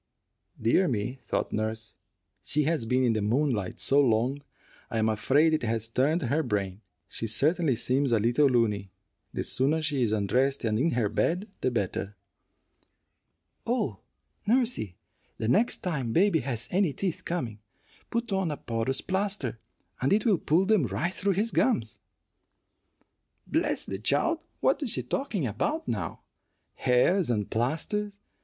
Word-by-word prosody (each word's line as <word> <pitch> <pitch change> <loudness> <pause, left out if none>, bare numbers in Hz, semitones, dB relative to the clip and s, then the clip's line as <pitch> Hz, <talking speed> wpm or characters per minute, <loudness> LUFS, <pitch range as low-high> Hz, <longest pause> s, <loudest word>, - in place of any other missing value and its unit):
"Dear 120 +12 +3
me," 125 +2 -2
thought - - -2
nurse, 110 0 -3 0.5
"she 150 - 0
has 155 -5 0
been 125 +3 +2
in 120 -2 +3
the 110 - -1
moonlight 115 -2 0
so 140 +1 +3
long 125 +2 +2 0.5
I - - -3
am 110 0 +2
afraid 135 +9 +3
it 155 - +1
has 115 -1 -1
turned 145 +8 +1
her 140 +6 +1
brain. 100 -6 -2 0.3
She 115 - -4
certainly 150 - +3
seems 130 +3 +1
a 115 - +4
little 120 +7 +3
looney. 110 -6 +1 0.4
The - - -3
sooner 140 +5 +1
she 150 -4 -1
is 115 -3 +2
undressed 125 +7 +1
and 110 0 +1
in 160 +6 +2
her 120 -3 +1
bed, 175 - 0
the - - +2
better." 100 -3 -2 1.5
"Oh, 215 - -1 0.5
nursey, 230 - +1 0.4
the 110 - -2
next 210 - +2
time 135 -10 -2
baby 190 -2 +4
has 120 -5 -3
any 185 -5 +2
teeth 185 0 -3
coming, 120 -12 -3 0.5
put 235 -1 -2
on 190 -3 0
a 150 - -3
porous 115 +3 -2
plaster, 190 - -2 0.4
and 130 - +1
it 210 +1 +3
will 205 -8 +3
pull 170 +5 +2
them 200 - +3
right 130 - -2
through 195 +1 0
his 215 +5 0
gums." 115 - +1 1.5
"Bless - - 0
the 95 - -5
child! 145 - +1 0.2
What - - +2
is 265 -6 +2
she 125 - -2
talking 195 - -2
about 305 - -2
now? - - -3 0.5
Hares 140 +8 +2
and 105 -4 0
plasters! 200 - -1
130 Hz, 155 wpm, -28 LUFS, 115-175 Hz, 1.5 s, a